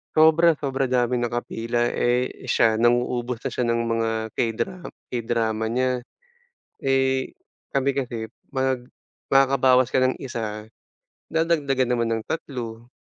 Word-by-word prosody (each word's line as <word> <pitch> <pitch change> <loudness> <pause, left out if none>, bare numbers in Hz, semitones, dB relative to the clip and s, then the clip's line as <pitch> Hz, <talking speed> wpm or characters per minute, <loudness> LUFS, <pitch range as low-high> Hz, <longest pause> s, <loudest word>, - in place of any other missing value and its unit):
sobra 160 +2 +6
sobra 135 -2 -1
daming 125 -1 +1
nakapila. 120 0 -1
Eh, 125 +1 0
siya, 110 -2 +3
nang-uubos 120 0 +1
na - - -1
siya 125 - -1
ng 115 0 +1
mga 115 -1 0 0.3
K-dra 120 - -1 0.4
K-drama 115 -2 -1
niya. 130 +2 +1 0.9
Eh, 135 -1 +1 0.4
kami 140 0 +2
kasi, 120 -4 -3 0.3
mag 130 -2 0 0.4
makakabawas 130 -2 +4
ka 130 - +3
ng 130 0 +2
isa, 110 -5 -4 0.6
dadagdagan 145 -6 +1
naman 120 -1 +1
ng 110 - -4
tatlo. 120 -6 -5
125 Hz, 120 wpm, -24 LUFS, 115-135 Hz, 0.9 s, sobra